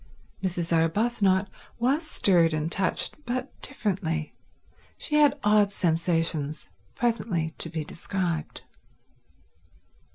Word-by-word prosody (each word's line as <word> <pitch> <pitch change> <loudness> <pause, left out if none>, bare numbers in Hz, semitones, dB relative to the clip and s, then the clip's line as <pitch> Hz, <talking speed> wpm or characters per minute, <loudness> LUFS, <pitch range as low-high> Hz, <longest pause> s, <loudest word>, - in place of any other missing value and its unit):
Mrs. 175 -3 -1
Arbuthnot 190 +3 +2 0.3
was 265 +6 +2
stirred 175 - +3
and 155 +2 -2
touched, 195 - +1
but 255 +1 -3
differently. 185 - -2 0.6
She 300 - 0
had 290 -1 +5
odd 210 -1 +4
sensations—presently 165 - -1
to 165 - -2
be 160 -2 -4
described. 170 -1 -3
185 Hz, 90 wpm, -26 LUFS, 165-230 Hz, 0.6 s, had